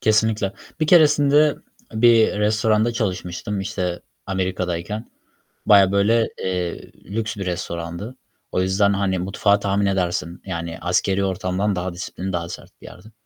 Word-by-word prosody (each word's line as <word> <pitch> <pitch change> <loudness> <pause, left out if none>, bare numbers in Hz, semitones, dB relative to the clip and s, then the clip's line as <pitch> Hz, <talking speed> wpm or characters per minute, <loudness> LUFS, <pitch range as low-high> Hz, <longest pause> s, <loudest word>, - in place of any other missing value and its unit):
Kesinlikle. 110 -2 +2 0.3
Bir 155 - +2
keresinde 150 -2 +5 0.4
bir 115 -2 +4
restoranda 110 +2 +2
çalışmıştım, 95 -2 -3
işte, 90 -2 -3 0.3
Amerika'dayken. 95 +2 -3 0.6
Bayağı 100 -2 +6
böyle, 110 +3 +3
eee, 90 -2 -3
lüks 110 +3 -3
bir 100 -2 -5
restorandı. 85 +5 -5 0.4
O 90 - +1
yüzden, 100 +2 +2
hani, 100 -1 0
mutfağı 100 +2 +1
tahmin 100 0 0
edersin, 90 -3 -1
yani, 85 -3 -5
askeri 95 +2 +1
ortamdan 95 +1 -1
daha 90 0 -3
disiplinli, 90 +2 -6
daha 85 -1 -3
sert - - -9
bir - - -11
yerdi. 110 - -14
100 Hz, 130 wpm, -22 LUFS, 90-110 Hz, 0.6 s, Bayağı